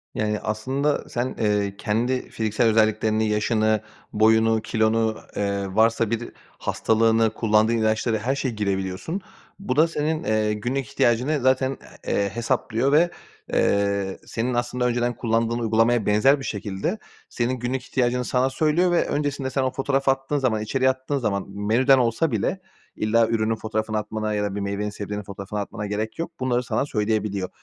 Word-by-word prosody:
Yani, 105 0 -1
aslında 130 +7 -1
sen, 125 +2 -2
eee, 105 -2 +1
kendi 120 +5 -1
fiziksel 110 +1 0
özelliklerini, 110 0 +2
yaşını, 110 0 +1 0.3
boyunu, 110 +1 +4
kilonu, 110 0 +1 0.2
eee, 100 -1 -1
varsa 115 0 +3
bir 115 +1 -2 0.3
hastalığını, 115 0 +2
kullandığın 110 +1 +2
ilaçları, 110 +1 +1
her 125 +6 -1
şeyi 130 -4 -2
girebiliyorsun. 95 - -2 0.4
Bu 130 -10 -2
da 155 +3 +5
senin 155 0 -2 0.4
günlük 130 +1 -1
ihtiyacını 125 +6 +2
zaten, 130 +1 +2 0.3
eee, 100 0 +1
hesaplıyor 115 +3 0
ve, 165 +4 +5 0.4
eee, 100 -1 +1
senin 120 +2 -2
aslında 120 +1 -1
önceden 120 0 0
kullandığın 115 +1 0
uygulamaya 115 0 +2
benzer 120 +8 +4
bir 135 - -6
şekilde 105 - -3 0.3
senin 120 +1 -1
günlük 125 +1 -2
ihtiyacını 125 -1 0
sana 130 +2 +1
söylüyor. 160 +5 +2
Ve 175 - +2
öncesinde 145 -2 -2
sen 135 - -1
o 130 - 0
fotoğrafı 135 0 +1
attığın 135 +2 -2
zaman, 115 -6 +1
içeriği 130 +4 +1
attığın 130 +2 -2
zaman, 100 -6 -1
menüden 115 +7 +3
olsa 120 +5 +1
bile, 115 - -1 0.3
illa 115 +1 +2
ürünün 115 0 0
fotoğrafını 110 0 -2
atmana 110 0 -2
ya 105 - 0
da 100 -1 -2
bir 105 - -2
meyvenin, 100 +1 -2
sebzenin 105 0 -5
fotoğrafını 100 +1 -6
atmana 105 +1 -5
gerek 110 +6 -3
yok. 165 - -3
Bunları 125 -1 0
sana 135 - -1
söyleyebiliyor. 105 -5 -1
115 Hz, 155 wpm, -24 LUFS, 105-130 Hz, 0.4 s, da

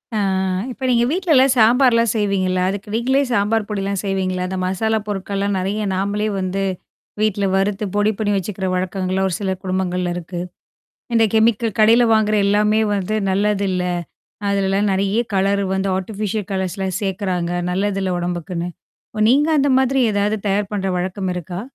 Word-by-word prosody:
அ, - - +1 0.5
இப்ப 260 +1 -5
நீங்க 235 -1 +3
வீட்லலாம் 310 -6 +3
சாம்பார்லாம் 230 0 +4
செய்வீங்கல்ல. 190 -4 0
அதுக்கு 205 +1 -5
நீங்களே 260 +4 +2
சாம்பார் 210 0 +1
பொடிலாம் 200 -1 -2
செய்வீங்களா, 185 -2 -1
அந்த 190 +1 -4
மசாலா 220 +4 0
பொருட்கள்லாம் 200 0 -2
நிறைய 200 +3 -2
நாமளே 205 +2 -1
வந்து 190 +1 -2 0.6
வீட்ல, 205 -2 +1
வறுத்து 195 +2 0
பொடி 205 +1 +3
பண்ணி 205 -1 0
வச்சுக்கிற 190 0 -4
வழக்கங்கள்லாம், 185 +1 -1
ஒரு 175 - -2
சில 190 -2 -1
குடும்பங்கள்ல 180 -1 -1
இருக்கு. 175 0 -6 0.7
இந்த 225 -1 +4
கெமிக்கல் 225 -1 +2
கடையில 225 +3 +6
வாங்குற 215 -1 +2
எல்லாமே 210 +2 +3 0.2
வந்து 200 +2 -2
நல்லதில்ல. 195 -2 0 0.7
அதுலெல்லாம் 200 +1 +1
நெறைய 195 +3 +1
கலரு 200 +1 +1
வந்து, 190 0 0
ஆட்டிபிஷியல் 205 +1 -3
கலர்ஸ்லாம் 190 -1 -2
சேர்க்குறாங்க. 185 -3 -2 0.2
நல்லதுல்ல 190 -1 -1
உடம்புக்குன்னு. 175 0 -3 0.5
ஓ! 215 - -4
நீங்க 285 +5 +4
அந்த 280 0 +2
மாதிரி 265 +1 +1
ஏதாவது 205 +2 +1
தயார் 200 +1 0
பண்ற 195 -1 -1
வழக்கம் 185 +1 -3
இருக்கா? 180 +1 -5
200 Hz, 145 wpm, -20 LUFS, 190-215 Hz, 0.7 s, கடையில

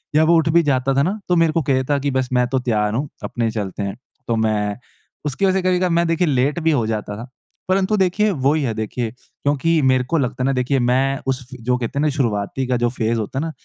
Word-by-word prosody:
या 155 - +5
वो 170 +2 +4
उठ 160 0 +2
भी 170 - +5
जाता 135 -2 +1
था 140 - +3
ना 195 +7 -1
तो 180 - +4
मेरे 165 -2 +3
को 165 - +2
कहता 135 0 +1
कि 140 +1 -1
बस 130 -1 -1
मैं 125 -1 +3
तो 130 +1 0
तैयार 105 -4 0
हूँ, 135 +5 -2
अपने 115 -2 -1
चलते 100 -2 -4
हैं। 100 -1 -3 0.3
तो 115 - +1
मैं 105 -2 0 0.5
उसकी 150 +7 0
वज़ह 190 - +3
से - - +1
कभी-कभार 185 0 +1
मैं 170 0 +2
देखिए 165 +2 +1
लेट 140 +3 +1
भी 160 - +3
हो 130 -7 +1
जाता 105 -2 -3
था। 115 +3 -8 0.4
परंतु 190 +2 +2
देखिए, 195 +3 +2
वो 140 -3 +1
ही 155 -1 0
है 120 -4 -1
देखिए, 110 +2 -3
क्योंकि 145 +5 -1
मेरे 130 -1 +3
को 150 +7 -1
लगता 130 -2 -1
है - - +1
ना, 135 - +2
देखिए 130 +1 +1
मैं 130 +2 +1
उस 130 -1 0
फ़े 130 - -9
जो 125 +1 +1
कहते 125 +3 -3
है - - +2
ना 155 - +3
शुरआती 130 -3 -1
का 125 -1 +1
जो 120 0 +1
फ़ेज़ 115 -1 -1
होता 110 +5 -3
है 155 - -2
ना, 165 - -3
130 Hz, 265 wpm, -20 LUFS, 120-160 Hz, 0.5 s, या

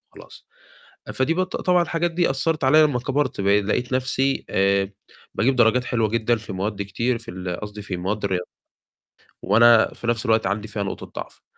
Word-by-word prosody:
خلاص، - - -14 0.7
فدي 140 +5 +1
بت 185 +1 -2
طبعًا 180 -1 +2
الحاجات 170 0 -1
دي 170 -3 +1
أثّرت 150 +2 -1
عليَّ 155 +4 +6
لمّا 145 -5 +2
كبرت، 135 -3 -1
بقي 100 +1 +3
لقيت 120 +5 -2
نفْسي 130 +1 0
آآ 100 0 +1 0.4
باجيب 130 +2 +1
درجات 120 +1 +3
حلوة 115 -3 0
جدًا 115 +2 +1
في 110 -2 -8
مواد 100 +2 -3
كتير، 115 +5 -2
في 115 - -10
ال 90 -1 -5
قصدي 105 0 -7
في 95 -2 -5
مواد 100 +4 -3
الرياضيات، 90 -2 -2 0.9
وأنا 115 0 +5
في 120 - -8
نفْس 120 +1 -1
الوقت 110 -2 +2
عندي 105 +2 -2
فيها 105 -1 -4
نقطة 95 - -5 0.2
ضعف، - - -20
115 Hz, 180 wpm, -22 LUFS, 100-130 Hz, 0.9 s, عليَّ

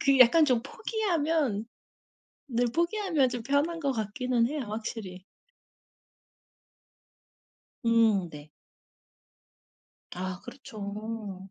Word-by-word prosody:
그 275 -1 +4
약간 305 +6 +7
좀 250 -5 +2
포기하면 320 - 0 0.8
늘 245 0 +1
포기하면 340 - +2
좀 245 -2 -4
편한 285 +6 +1
것 280 -3 +1
같기는 235 +2 0
해요 300 0 -3
확실히. 210 -4 -5 2.6
음 225 -6 +4
네. 150 0 -11 1.7
아 185 0 -4
그렇죠. 210 -5 -7
235 Hz, 160 characters per minute, -29 LUFS, 210-285 Hz, 2.6 s, 약간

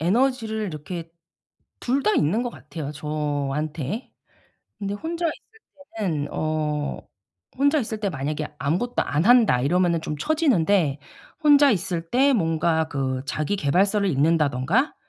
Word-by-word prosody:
에너지를 220 +3 +1
이렇게 165 +1 -6 0.7
2 265 +3 0
다 215 - +2
있는 175 +11 +2
것 245 - -3
같아요 150 -9 -7
저한테. 150 - -3 0.7
근데 200 -1 -3
혼자 335 +9 -3
있을 445 +7 -7 0.4
때는 160 -9 -1
어 155 -1 -2 0.6
'혼자 285 +3 +3
있을 220 -2 -4
때 205 - 0
만약에 150 0 -3
아무것도 180 +12 0
안 150 +3 0
한다.' 230 - +5
이러면은 170 +4 +2
좀 150 - -4
쳐지는데 200 - +2 0.4
혼자 290 -2 +6
있을 170 -4 -2
때 275 +3 +4
뭔가 160 -4 +1
그 130 -3 -2
자기 155 +7 -1
계발서를 195 +5 +2
읽는다든가 150 - +1
170 Hz, 275 characters per minute, -24 LUFS, 150-225 Hz, 0.7 s, 혼자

